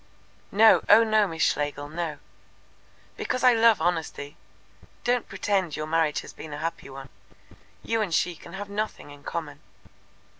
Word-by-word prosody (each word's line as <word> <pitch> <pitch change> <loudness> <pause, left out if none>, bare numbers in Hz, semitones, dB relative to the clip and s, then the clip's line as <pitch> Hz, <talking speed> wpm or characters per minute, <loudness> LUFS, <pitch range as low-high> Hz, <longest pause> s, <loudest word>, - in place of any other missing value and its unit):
"No, 220 +2 +6
oh 215 +2 +8
no, 215 -2 +3
Miss 160 -3 -2
Schlegel, 145 0 -1
no." 160 0 -4 1.0
"Because 255 - -2
I 250 -1 +7
love 225 -2 +5
honesty. 160 -4 -2 0.7
Don't 245 -1 0
pretend 195 -4 -1
your 155 - -4
marriage 160 -1 +1
has - - -12
been 155 -2 -9
a - - -5
happy 165 -1 -5
one. 135 0 -10 0.7
You 225 -1 0
and 205 -5 -2
she 175 +2 +1
can 170 +2 -13
have 200 +1 -6
nothing 205 -7 -4
in 145 0 -13
common." 150 -4 -5
170 Hz, 155 wpm, -26 LUFS, 150-215 Hz, 1.0 s, oh